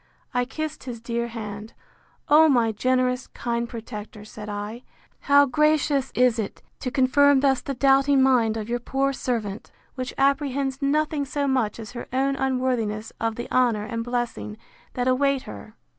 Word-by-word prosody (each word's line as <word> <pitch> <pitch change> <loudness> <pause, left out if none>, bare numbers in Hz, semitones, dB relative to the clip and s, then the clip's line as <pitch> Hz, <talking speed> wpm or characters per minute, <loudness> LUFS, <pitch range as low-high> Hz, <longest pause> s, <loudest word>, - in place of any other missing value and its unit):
I 245 0 +1
kissed 310 +3 -5
his 240 -3 -6
dear 235 +1 -2
hand: 215 -2 -7 0.5
O 315 +2 +6
my 235 -5 +3
generous, 255 +3 0
kind 235 0 -3
protector, 215 -2 -8
said 210 0 -9
I, 210 +3 -5 0.4
how 285 0 +5
gracious 295 -1 +2
is 245 -2 +3
it 210 - -5 0.2
to 255 - -3
confirm 275 +1 +4
thus 270 -2 +2
the 275 - -4
doubting 275 +1 +4
mind 235 -4 +3
of 215 -1 -4
your 240 +1 -1
poor 270 +3 0
servant! 225 -6 -3 0.2
which 255 -1 -5
apprehends 275 -1 +1
nothing 300 +1 +1
so 285 +1 -2
much 255 -5 0
as 225 +1 -8
her 240 -1 -7
own 270 +2 +1
unworthiness 250 -5 -1
of 225 -1 0
the 240 - -5
honour 240 -5 +2
and 230 0 -3
blessing 235 - -3 0.4
that 245 0 -1
await 270 +1 +2
her! 215 - -10
250 Hz, 160 wpm, -24 LUFS, 230-275 Hz, 0.5 s, O